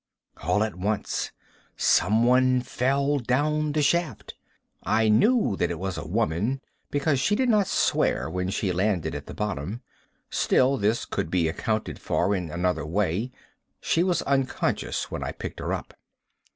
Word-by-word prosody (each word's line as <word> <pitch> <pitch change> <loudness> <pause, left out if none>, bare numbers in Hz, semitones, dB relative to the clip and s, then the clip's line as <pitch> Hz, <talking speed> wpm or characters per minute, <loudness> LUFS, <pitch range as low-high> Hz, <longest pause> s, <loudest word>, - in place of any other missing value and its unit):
All 105 - +2
at 110 -2 -2
once, 100 +4 -2 0.5
someone 125 +5 +4
fell 140 +3 0
down 150 +5 0
the 150 -1 +1
shaft. 155 - 0 0.5
I 110 0 +2
knew 170 - +3
that 90 - +1
it 85 - -3
was 95 0 -3
a 85 -1 -6
woman, 110 +6 0 0.3
because 145 -1 +1
she 180 +10 +2
did 255 +2 +1
not 210 -4 +3
swear - - +1
when 90 0 -2
she 95 0 -1
landed 95 -1 0
at - - -6
the - - -8
bottom. 105 - -3 0.5
Still, 135 +2 +3
this 110 +1 +1
could - - -3
be 85 -2 +1
accounted 110 +6 -2
for 90 +4 0
in 90 -3 -3
another 90 0 -1
way. 95 - -1 0.5
She 165 - +1
was 180 -1 +1
unconscious 135 -2 -1
when - - -4
I - - -4
picked - - -7
her - - -3
up. - - -4
110 Hz, 155 wpm, -26 LUFS, 95-140 Hz, 0.5 s, someone